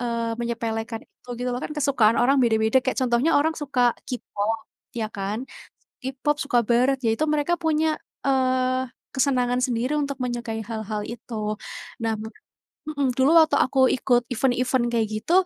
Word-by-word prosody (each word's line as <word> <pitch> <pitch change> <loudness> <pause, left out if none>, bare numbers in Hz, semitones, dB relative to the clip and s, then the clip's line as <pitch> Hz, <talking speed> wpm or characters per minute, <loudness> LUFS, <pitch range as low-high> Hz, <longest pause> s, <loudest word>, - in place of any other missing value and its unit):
eee, 235 -1 -1
menyepelekan 225 -1 -3
itu - - -30
gitu 250 0 -2
loh, 245 - -2
kan - - -5
kesukaan 260 -6 +3
orang 275 +3 +4
beda-beda. 220 +1 +3
Kayak 260 - -1
contohnya 250 +6 +2
orang 320 +2 +1
suka 255 -5 +2 0.2
K-pop 225 -3 -3 0.3
ya 225 -2 -1
kan, 205 +5 -3 0.5
s 265 0 -5
K-pop, 295 +3 0
suka 250 -3 +2
barat, 255 +3 +3
ya 225 - +3
itu 310 - +1
mereka 300 +3 +1
punya, 315 -1 +1 0.3
eee, 255 -1 +2 0.3
kesenangan 250 -2 +2
sendiri 250 +3 0
untuk 280 -2 -2
menyukai 240 -2 -3
hal-hal 215 -1 -4
itu. 215 -2 -4 0.5
Nah 225 -1 +1 0.7
mhm, 285 -4 0
dulu 265 +3 +4
waktu 315 -1 +5
aku 265 +1 +2
ikut 245 -2 +2
event-event 250 0 +1
kayak 230 -1 +2
gitu, 215 +9 -3
250 Hz, 155 wpm, -24 LUFS, 230-275 Hz, 0.7 s, waktu